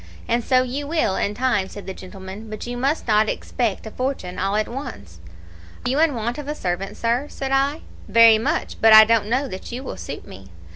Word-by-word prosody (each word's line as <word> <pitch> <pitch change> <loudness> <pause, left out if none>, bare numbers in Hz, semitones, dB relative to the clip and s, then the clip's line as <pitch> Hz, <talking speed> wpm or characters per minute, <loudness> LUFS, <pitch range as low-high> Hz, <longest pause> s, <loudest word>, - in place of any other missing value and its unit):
"'And 235 0 +1
so 255 +1 +3
you 275 +3 -4
will, 310 - +1
in 205 - -1
time,' 240 -6 0
said 205 - -9
the 190 - -5
gentleman, 190 +3 -10
'but 215 0 -6
you 245 0 -5
must 275 +5 -1
not 215 0 +3
expect 230 -5 -2
a 220 - -7
fortune 255 -9 -3
all 195 +2 0
at 215 0 +1
once.' 100 - -8 0.7
"'Are - - +1
you 275 - +1
in 320 -4 +3
want 235 +4 -3
of 290 - -7
a 300 - -3
servant, 185 -3 -3
sir?' 240 +5 0
said 270 -1 -5
I. 275 +3 +1 0.3
"'Very 225 +1 +7
much; 225 - -2
but 225 0 +7
I 220 0 +11
don't 225 -2 +2
know 260 +4 +1
that 190 -2 -8
you 250 +3 -5
will - - -6
suit - - -7
me.' 95 0 -12
230 Hz, 225 wpm, -22 LUFS, 200-260 Hz, 0.7 s, I